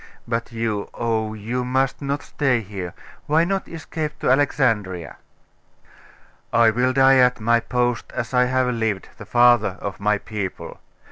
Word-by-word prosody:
But 115 0 -2
you 115 -3 -2
oh, 110 -2 -1
you 115 +4 -3
must 130 +2 0
not 140 +1 -2
stay 130 -5 0
here. 95 -4 -7 0.3
Why 155 +3 +3
not 195 +2 -1
escape 155 -2 -5
to - - +2
Alexandria?' 115 - 0 1.3
'I 115 -1 +5
will 125 +3 +1
die 135 0 +5
at 125 -1 +4
my 115 +2 +3
post 120 0 -1
as 120 -1 -4
I 125 0 +4
have 130 0 +1
lived, 110 -4 -2
the - - -10
father 120 -5 +4
of 100 -2 -5
my 105 +1 +2
people. 105 -2 -6
120 Hz, 150 wpm, -22 LUFS, 110-130 Hz, 1.3 s, I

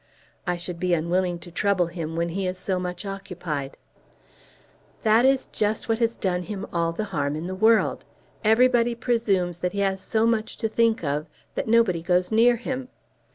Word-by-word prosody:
"I 180 0 0
should 175 0 -6
be 180 -1 +2
unwilling 175 +2 0
to 175 - -11
trouble 195 0 +1
him 165 -2 -5
when 170 +1 0
he 190 +2 -2
is 185 0 -3
so 185 0 -1
much 180 +1 -5
occupied." 180 -8 -5 1.3
"That 225 +2 +5
is 270 0 +3
just 215 +1 -1
what 225 0 +1
has 230 0 +1
done 180 -3 -1
him 200 +1 -5
all 170 -1 +1
the 190 +6 -3
harm 145 -1 0
in 155 +2 -4
the 185 - -4
world. 220 +4 +3 0.4
Everybody 235 +1 +4
presumes 210 -8 0
that 180 +1 -2
he 200 - -2
has 195 -1 0
so 220 +3 +1
much 230 -1 0
to 225 - -1
think 225 -2 +1
of 150 +2 -1 0.3
that - - -3
nobody 220 -7 +3
goes 180 +2 +1
near 235 +2 +5
him. 255 +2 -4
190 Hz, 185 wpm, -25 LUFS, 175-225 Hz, 1.3 s, That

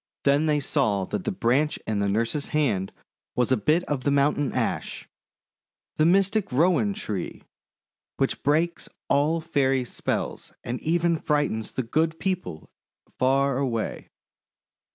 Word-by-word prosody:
Then 145 +3 +3
they 150 -1 +2
saw 120 -9 +1
that 185 - -4
the 215 - 0
branch 145 - +1
in 110 -2 -1
the 100 0 +1
nurse's 115 +8 -1
hand 115 -12 0 0.4
was 125 0 +1
a - - +6
bit 155 - +2
of 140 -6 -3
the 145 - +1
Mountain 140 0 +2
Ash - - -3 0.4
— - - -68
the 155 - +4
mystic 195 +3 +2
Rowan 180 +8 +2
tree 105 - -5 0.4
— - - -68
which - - 0
breaks 160 +5 0 0.2
all 155 +4 +2
Fairy 135 -5 +1
spells, - - -3
and 120 +1 -3
even 170 +1 +1
frightens 145 -8 -1
the 130 - -1
Good 160 +7 0
People 180 - -3 0.5
far 135 +1 +2
away. 120 -5 -2
145 Hz, 145 wpm, -25 LUFS, 125-165 Hz, 0.5 s, a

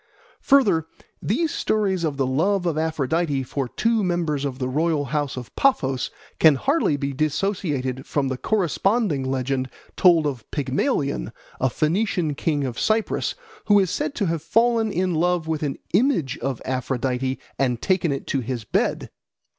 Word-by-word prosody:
Further, 200 - +4 0.3
these 305 - 0
stories 195 -5 0
of 150 -4 -1
the 135 - +1
love 180 +9 +1
of 170 -3 0
Aphrodite 155 -2 0
for 135 +1 -3
two 225 - +1
members 165 -6 0
of 135 -2 -3
the 130 -1 -2
royal 150 +2 0
house 145 0 -2
of 125 - -8
Paphos 135 - +1 0.3
can 155 -3 +7
hardly 275 - +1
be 140 0 -3
dissociated 150 -4 -1
from 140 -2 0
the 130 - -1
corresponding 195 - +1
legend 130 0 -1 0.3
told 170 -4 +5
of 130 -7 -4
Pygmalion, 140 - -1 0.3
a 130 - +2
Phoenician 170 - 0
king 145 0 -1
of 125 -3 -3
Cyprus, 220 0 0 0.3
who 205 -1 +5
is 190 -4 +2
said 300 0 -2
to 205 - 0
have 165 -3 -1
fallen 225 +5 +2
in 185 -1 0
love 175 +1 +1
with 160 -2 -1
an 145 -3 -2 0.2
image 195 - +2
of 130 -1 -3
Aphrodite 130 0 -1 0.2
and 125 -3 +1
taken 180 -1 +1
it 135 - -3
to 135 - -1
his 120 -1 -4
bed. 105 - -1
155 Hz, 160 wpm, -23 LUFS, 135-190 Hz, 0.3 s, can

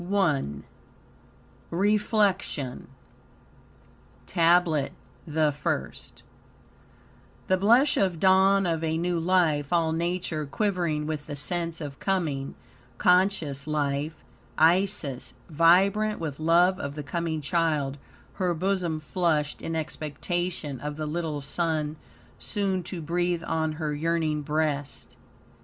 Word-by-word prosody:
I 180 -9 +2 1.3
REFLECTION 200 - 0 1.4
TABLET 170 -4 +3 0.3
THE 155 -1 +2
FIRST 145 -1 -4 1.2
The 185 - +2
blush 235 +9 +4
of 185 -4 +1
dawn 190 +1 +5
of 165 -2 -1
a 160 0 0
new 175 0 0
life, 165 -5 +2
all 165 -2 +2
nature 170 -2 -2
quivering 170 -3 -1
with 150 -1 -4
the 145 - -5
sense 170 +3 -2
of 145 -3 -7
coming, 155 -8 -1 0.4
conscious 180 -6 +2
life; 150 +1 -1 0.4
Isis, 160 -5 +1 0.2
vibrant 195 +7 +4
with 155 -4 -4
love 175 +4 +4
of 140 0 -5
the 150 - -5
coming 165 +2 -2
child, 150 -3 0 0.4
her 180 -2 +1
bosom 180 -2 -1
flushed 155 -2 -1
in 165 - -3
expectation 155 -1 -3
of 150 +3 -5
the 155 - -3
little 155 -1 -3
son 155 +1 -1 0.4
soon 195 -3 -1
to 175 -2 -6
breathe 175 +1 0
on 160 -1 -1
her 155 -1 -3
yearning 155 0 0
breast. 145 -5 -2
165 Hz, 110 wpm, -27 LUFS, 150-180 Hz, 1.4 s, dawn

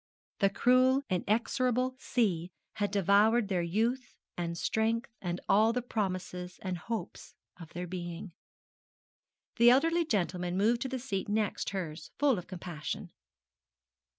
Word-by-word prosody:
The 195 - +4
cruel 255 +6 +4
inexorable 245 +6 +1
sea 185 -11 0 0.3
had 205 -1 0
devoured 205 +3 +3
their 185 -3 +1
youth 225 +9 -1 0.2
and 170 -1 -3
strength 225 +5 0
and 175 -1 -3
all 220 +3 +4
the 250 0 -1
promises 185 -5 -3
and 185 -1 -2
hopes 225 +4 -6 0.2
of 165 -2 -11
their 175 +1 -4
being. 175 0 -6 1.2
The 235 0 +7
elderly 330 +7 +4
gentleman 180 - -1
moved 230 +4 +2
to 265 - -2
the 260 - -2
seat 220 -7 -3
next 210 -1 0
hers 165 -5 -5
full 275 -8 +3
of 180 - -11
compassion. 175 -4 -6
205 Hz, 130 wpm, -31 LUFS, 180-240 Hz, 1.2 s, The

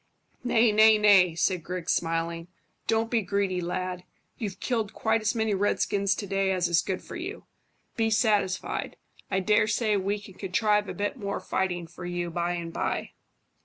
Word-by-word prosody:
"Nay, 235 -2 +4
nay, 215 +1 +6
nay," 195 -5 +5
said 175 0 0
Griggs, 180 0 -3
smiling; 165 0 -2 0.4
"don't 225 0 +1
be 230 -2 +2
greedy, 195 -1 -1
lad. 180 +1 -3 0.4
You've 205 -5 -4
killed 225 -5 -1
quite 225 0 +1
as 215 +3 0
many 220 -2 +1
redskins 200 0 +1
to 205 - -5
day 195 0 0
as 180 -2 +1
is 170 -1 +3
good 190 -1 -4
for - - -9
you. 365 +5 -6 0.5
Be 225 -1 +2
satisfied. 210 -3 0 0.3
I 190 - +1
dare 210 +2 +3
say 215 -1 +1
we 200 +2 -1
can 200 -1 -13
contrive 210 +2 +1
a - - -5
bit 205 +5 -2
more 200 -4 -3
fighting 180 -2 -2
for 170 +2 -11
you 175 -1 -3
by 175 +1 -1
and 170 -1 -5
by." - - -2
200 Hz, 175 wpm, -27 LUFS, 180-215 Hz, 0.5 s, nay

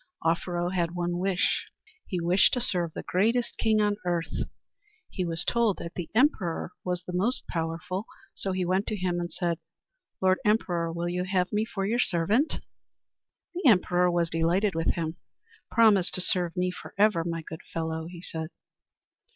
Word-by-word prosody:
Offero 175 +1 0
had 175 -1 0
one 175 0 -1
wish. 190 0 +1 0.4
He 180 - -2
wished 175 +3 +4
to - - 0
serve 180 -8 0
the - - -5
greatest 230 +6 +1
king 220 -1 +3
on 205 -1 +2
earth. 170 -2 -1 0.6
He 185 - -2
was 165 -1 -2
told 235 -5 +2
that 170 - -7
the 175 -3 -5
emperor 215 - +2
was 180 -1 -2
the 180 - -7
most 210 +8 +1
powerful. 170 +4 -3 0.3
So 195 - -2
he 185 -1 0
went 190 +3 +1
to 215 - -1
him 180 -3 -1
and 175 0 -3
said, 170 -2 -1 0.6
"Lord 185 0 +3
Emperor, 175 -6 +1
will 170 +1 -2
you 180 +1 -1
have 185 -1 +1
me 210 +1 +2
for 195 -4 -3
your 230 +4 +1
servant?" 210 - +2 0.9
The 345 -6 +4
emperor 180 -3 +4
was 170 -1 +1
delighted 175 +5 +2
with 165 0 0
him. 165 -1 -3 0.5
"Promise 210 -6 +5
to 185 - 0
serve 180 -1 0
me 180 0 +1
for - - -10
ever, 200 -5 +4
my 165 -1 -3
good 160 +1 -8
fellow," 160 0 -3
he 175 0 -10
said. 160 -2 -4
180 Hz, 175 wpm, -28 LUFS, 170-200 Hz, 0.9 s, Promise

